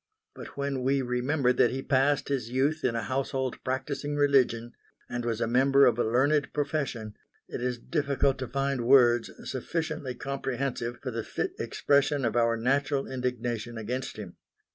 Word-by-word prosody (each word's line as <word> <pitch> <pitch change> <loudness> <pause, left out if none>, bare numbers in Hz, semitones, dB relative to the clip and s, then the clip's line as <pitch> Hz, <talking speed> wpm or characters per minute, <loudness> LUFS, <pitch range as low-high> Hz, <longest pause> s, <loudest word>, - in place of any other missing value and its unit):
But - - -11
when 140 -2 -2
we 135 +1 +1
remember 125 +2 +1
that 120 - +4
he 135 +1 -4
passed 140 +1 +2
his 130 -5 -1
youth 140 +5 0
in 125 -2 +1
a 115 - -1
household 130 +2 -2
practising 140 +2 -3
religion, 130 -5 +2 0.3
and 120 0 -4
was 115 -2 -1
a - - +1
member 135 +4 +4
of 120 -1 +3
a - - +3
learned 135 +6 +2
profession, 140 -7 -2 0.3
it - - -6
is 125 0 -1
difficult 140 -1 0
to 130 - -3
find 135 -1 -1
words 120 -3 +5 0.2
sufficiently 150 -1 -3
comprehensive 130 -2 -3
for 130 - -3
the 115 -1 -3
fit - - -3
expression 140 -1 +1
of 115 -1 -1
our 115 -1 +3
natural 135 +3 +1
indignation 120 -3 -3
against 120 +4 -4
him. 100 -5 -8
130 Hz, 165 wpm, -28 LUFS, 120-140 Hz, 0.3 s, words